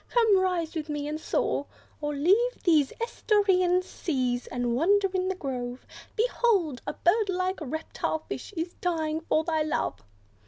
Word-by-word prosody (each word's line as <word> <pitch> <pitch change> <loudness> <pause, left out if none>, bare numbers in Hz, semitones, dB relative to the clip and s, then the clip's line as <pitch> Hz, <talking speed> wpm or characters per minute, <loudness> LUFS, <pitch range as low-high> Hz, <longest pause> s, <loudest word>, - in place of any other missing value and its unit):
Come, 445 -5 +4
rise 360 -4 0
with 315 -2 -4
me, 295 -1 -2
and 305 +1 -3
soar, 285 - 0 0.3
Or 295 0 -2
leave 405 - +2
these 310 -6 +4
estuarian 385 -6 +2
seas, 255 -9 -2
and 245 -1 -1
wander 390 +8 +3
in 370 0 0
the 380 - -1
grove; 255 -6 -5 0.3
Behold! 425 - +1
a - - -1
bird 415 +4 +2
like 370 +1 -1
reptile 315 +2 -3
fish - - -6
is 335 +2 -2
dying 320 -3 -1
for 315 -1 +1
thy 320 -1 0
love!" 305 0 -2
335 Hz, 155 wpm, -27 LUFS, 295-380 Hz, 0.3 s, Come